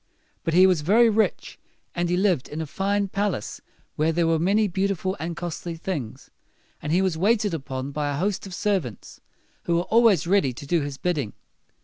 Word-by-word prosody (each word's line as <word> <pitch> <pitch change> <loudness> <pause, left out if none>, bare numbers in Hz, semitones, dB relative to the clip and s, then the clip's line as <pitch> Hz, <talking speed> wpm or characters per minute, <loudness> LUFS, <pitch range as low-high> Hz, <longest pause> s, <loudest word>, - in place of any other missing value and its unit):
But 165 - -1
he 185 +1 +8
was 180 -5 +3
very 225 +8 +4
rich, 220 +1 -1 0.3
and 175 0 -1
he 180 - +1
lived 185 -8 +1
in 150 - -5
a 160 - -2
fine 200 +5 -1
palace 200 - -2 0.4
where 155 +2 +2
there 170 +1 +1
were 165 -1 +2
many 205 +5 +2
beautiful 190 0 -1
and 165 +1 -4
costly 170 0 -5
things, 160 - -5 0.5
and 150 - -3
he 180 +3 +3
was 175 -4 -1
waited 210 0 +2
upon 135 -3 -4
by 145 0 -2
a 140 - -2
host 195 +3 -1
of 185 - -7
servants 180 - -3 0.4
who 170 - +1
were 170 - +2
always 220 -6 +4
ready 180 -8 +2
to 135 - -9
do 165 +3 +1
his 140 -1 -5
bidding. 150 -12 -2
175 Hz, 195 wpm, -24 LUFS, 155-195 Hz, 0.5 s, he